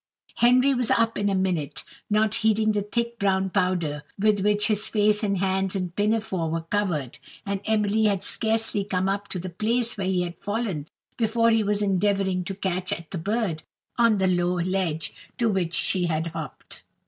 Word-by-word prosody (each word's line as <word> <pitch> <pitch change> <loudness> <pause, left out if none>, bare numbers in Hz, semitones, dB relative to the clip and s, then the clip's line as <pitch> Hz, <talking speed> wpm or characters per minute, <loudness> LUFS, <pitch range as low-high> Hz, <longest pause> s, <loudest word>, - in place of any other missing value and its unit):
Henry 255 +3 +5
was 245 -3 0
up 230 0 +2
in 205 0 0
a 195 - +1
minute, 175 -6 -1 0.3
not 215 0 +2
heeding 220 0 +2
the 210 -1 0
thick 235 +3 -3
brown 190 -1 +1
powder 170 -6 0 0.2
with 210 0 +2
which 210 +1 +3
his 210 -1 +1
face 210 0 +2
and 200 -2 0
hands 190 +1 0
and 180 -2 -3
pinafore 205 -5 0
were 165 +1 -1
covered; 165 -8 -2 0.3
and 200 -1 -2
Emily 215 0 +2
had 200 -2 +1
scarcely 220 -2 +1
come 190 -1 -1
up 200 +1 -2
to - - -3
the 180 +1 -5
place 225 +4 -1
where 190 - -1
he 185 -1 +1
had 175 0 -7
fallen, 205 -7 -2 0.3
before 230 0 +2
he 225 -1 +3
was 205 0 0
endeavouring 195 -1 +1
to 195 +1 -4
catch 185 -1 -2
at 170 -2 -4
the 180 - -3
bird 200 -3 -1 0.3
on 230 -3 +4
the 190 - +1
low 180 -1 +1
ledge 175 -3 -1 0.2
to 235 -2 +2
which 180 -5 0
she 180 -2 +1
had 160 -1 -1
hopped. 160 -4 -7
200 Hz, 185 wpm, -25 LUFS, 180-215 Hz, 0.3 s, Henry